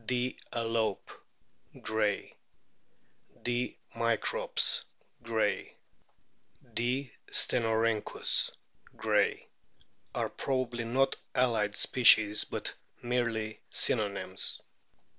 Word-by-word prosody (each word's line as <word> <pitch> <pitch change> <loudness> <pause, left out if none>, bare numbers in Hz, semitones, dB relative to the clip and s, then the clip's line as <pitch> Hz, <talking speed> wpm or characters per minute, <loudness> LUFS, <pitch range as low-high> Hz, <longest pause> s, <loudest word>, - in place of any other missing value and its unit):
D. 125 0 -1
a 115 - -2
lope, 115 -3 -1 0.7
Gray; 110 -2 -1 1.1
D. 120 +1 -1 0.2
microps, 115 -2 +2 0.4
Gray; 110 -4 -1 1.0
D. 125 +3 -1 0.2
stenorhynchiis^ 115 -2 +2 0.5
Gray, - - +1 0.7
are - - -1
probably 125 -3 -2
not 130 +3 +1 0.2
allied 115 -5 +1
species, 110 -4 +5
but - - -5 0.3
merely 115 -3 -1
synonyms. 105 -4 +1
115 Hz, 70 wpm, -30 LUFS, 110-125 Hz, 1.1 s, species